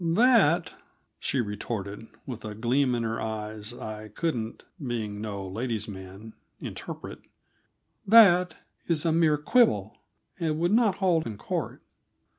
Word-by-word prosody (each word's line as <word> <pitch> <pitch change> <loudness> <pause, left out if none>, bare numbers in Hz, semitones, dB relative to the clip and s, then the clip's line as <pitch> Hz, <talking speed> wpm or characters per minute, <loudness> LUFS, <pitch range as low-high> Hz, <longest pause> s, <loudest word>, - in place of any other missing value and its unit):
"That," 175 - +4 0.5
she 135 - 0
retorted, 105 0 -5 0.2
with 125 -4 -7
a 105 -1 -6
gleam 125 +3 +1
in 120 - -1
her 115 0 -2
eyes 110 0 -5
I 110 -2 -7
couldn't 115 -1 -3 0.2
being 110 -5 -3
no 100 -3 -5
lady's 110 +1 -3
man 100 +2 -9 0.3
interpret - - -7 0.9
"that 180 -5 +7 0.3
is 165 -1 +1
a 165 - +3
mere 160 -2 +3
quibble, 150 - +2 0.4
and 160 -3 0
would 175 +3 +1
not 220 -4 +4
hold 180 -5 +1
in 110 -3 -6
court." - - -4
120 Hz, 130 wpm, -27 LUFS, 105-165 Hz, 0.9 s, that